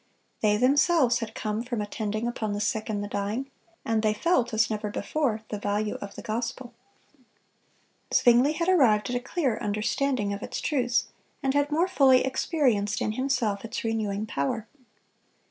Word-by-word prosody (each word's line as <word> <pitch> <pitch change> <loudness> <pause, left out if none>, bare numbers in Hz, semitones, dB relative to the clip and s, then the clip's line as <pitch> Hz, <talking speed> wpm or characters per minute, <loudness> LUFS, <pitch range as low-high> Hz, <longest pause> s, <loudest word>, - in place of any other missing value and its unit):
They 210 -1 +3
themselves 265 0 +3
had 225 -1 -6
come 215 0 -2
from 240 -1 -4
attending 210 +1 -3
upon 220 -3 -2
the 205 - -2
sick 220 0 -1
and 205 -1 -2
the - - -4
dying, 210 +7 -3 0.3
and 225 -1 +1
they 215 -1 +1
felt, 255 -3 +1
as 220 0 +2
never 210 -1 -3
before, 235 0 -1
the 210 - -4
value 205 +1 -1
of 200 - -7
the - - -8
gospel. 235 +2 -4 1.4
Zwingle 245 +5 +5
had 335 +2 -2
arrived 245 - +4
at - - -1
a - - +1
clearer 255 -3 -1
understanding 215 +1 0
of 200 - -6
its - - -4
truths, 250 -5 0 0.3
and 270 0 +1
had 285 +1 +1
more 330 +5 +2
fully 270 -8 +4
experienced 255 - +1
in 215 - -1
himself 245 -4 -1
its 230 - -5
renewing 215 -2 -1
power. 215 +5 -2
230 Hz, 165 wpm, -27 LUFS, 210-265 Hz, 1.4 s, Zwingle